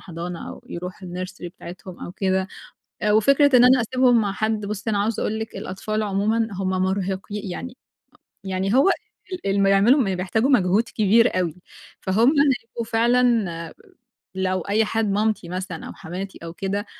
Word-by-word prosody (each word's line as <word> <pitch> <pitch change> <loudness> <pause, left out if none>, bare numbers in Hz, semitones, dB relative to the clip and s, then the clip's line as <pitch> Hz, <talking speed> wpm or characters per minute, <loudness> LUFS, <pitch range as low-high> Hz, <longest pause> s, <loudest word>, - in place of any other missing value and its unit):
حضانة 175 0 -7
أو - - -11
يرُوحوا 180 +2 -7
الnursery 180 0 -6
بتاعتهم 180 +1 -10
أو 175 - -8
كده. 190 -1 0 0.6
وفكرة 275 +6 +5
إن 245 - +7
أنا 255 0 +6
أسيبهم 245 0 +3
مع 200 -2 -1
حَد، 215 0 -1
بُصّي 210 +2 -3
أنا 205 - +1
عاوزة 210 +2 0
أقول 220 - -1
لِك 220 0 -6
الأطفال 215 +3 -3
عمومًا 215 +3 0
هُم 190 0 -2
مرهقي 190 +2 -1
يعني 180 - -6 0.7
يعني 190 +3 -1
هو 275 +9 +5 0.4
ال 365 - -4
اللي 195 +1 +1
ما 195 - +4
يعملوا 210 +9 +5
م 195 -6 0
بيحتاجوا 220 +8 0
مجهود 200 -3 +3
كبير 220 -1 +3
أوي، 170 -4 -1 0.5
فهُم 220 +6 +3 0.3
هيبقوا 230 0 -7
فعلًا 230 -7 +1 0.6
لو 185 -1 0
أي 215 +4 +1
حد 215 -1 0
مامتي 210 -3 0
مثلًا 180 -2 -5
أو - - -8
حماتي 190 +4 -7
أو 165 0 -7
كده، 200 +3 -3
200 Hz, 160 wpm, -23 LUFS, 185-225 Hz, 0.7 s, إن